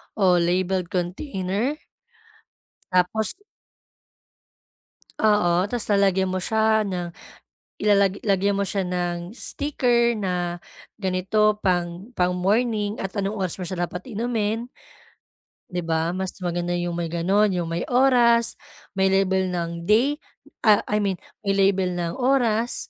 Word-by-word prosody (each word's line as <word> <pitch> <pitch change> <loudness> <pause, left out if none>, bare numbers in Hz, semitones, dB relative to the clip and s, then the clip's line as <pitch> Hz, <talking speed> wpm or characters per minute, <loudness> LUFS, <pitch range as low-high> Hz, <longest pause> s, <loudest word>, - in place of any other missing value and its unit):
o 185 -4 +4
labeled 180 +1 0
container. 190 - -2 1.2
Tapos 185 +4 +1 1.9
Oo, 185 -5 +3
ta's 245 -2 -2
lalagyan 195 -2 +3
mo 185 0 -2
siya 220 0 +2
ng 180 -3 -3 0.8
ilalag 200 -2 +4
lagyan 200 -1 +2
mo 200 - 0
siya 195 -1 -1
ng 175 +2 -3
sticker 245 -5 +1
na 180 -4 -2 0.4
ganito 205 +2 +1
pang 175 0 -1
pang 180 0 +2
morning 205 +3 0
at 195 - -4
anong 200 +2 -2
oras 190 -3 -2
mo 180 - -4
siya 175 0 -2
dapat 180 +5 -6
inumin. 225 0 -2 1.0
'Di 180 0 -2
ba, 165 0 -1
mas 190 0 -3
maganda 175 0 -1
yung 175 0 -2
may 170 -1 -3
gano'n, 190 +6 +2
yung 175 - -1
may 165 +1 -2
oras, 245 -2 +4 0.4
may 190 0 +2
label 190 -1 +2
ng 170 -1 -4
day 255 +8 +4 0.4
ah, 215 -3 +4
I 210 0 0
mean 195 -3 0 0.2
may 200 -1 0
label 195 -1 +3
ng 170 -1 -2
oras 240 -3 +1
195 Hz, 130 wpm, -23 LUFS, 180-215 Hz, 1.9 s, o